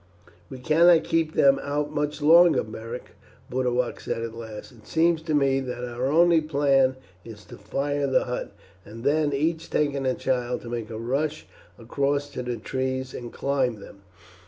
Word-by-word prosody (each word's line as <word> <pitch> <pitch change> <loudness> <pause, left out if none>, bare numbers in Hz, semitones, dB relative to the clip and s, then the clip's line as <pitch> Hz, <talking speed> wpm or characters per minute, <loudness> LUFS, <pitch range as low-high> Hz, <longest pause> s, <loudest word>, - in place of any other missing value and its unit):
"We 130 - -8
cannot 160 +5 +5
keep 165 -1 0
them 135 -1 +5
out 145 +1 -2
much 150 0 -2
longer, 170 +3 +6
Beric," 115 +3 -8 0.4
Boduoc 125 -1 -1
said 115 - -4
at 115 -1 -5
last. 110 -1 -9
"It 115 -4 -19
seems 165 0 +2
to 160 -2 -1
me 135 -2 +2
that 125 -2 -5
our 120 +2 -3
only 165 +3 +4
plan 140 -3 +2 0.3
is 110 -2 -12
to - - -12
fire 140 +7 -2
the 130 -1 +2
hut, 125 -1 -4 0.3
and 115 +4 -11
then, 150 +1 +2
each 160 +4 -1
taking 140 -3 0
a 130 - +1
child, 125 -2 -1
to 120 - -9
make 115 -2 -4
a 110 - -6
rush 140 +7 -2 0.3
across 140 +4 -1
to 135 - -5
the 125 -1 -4
trees 130 +2 -3
and 120 -1 -7
climb 130 -5 -1
them. 100 0 -13
135 Hz, 175 wpm, -25 LUFS, 120-150 Hz, 0.4 s, longer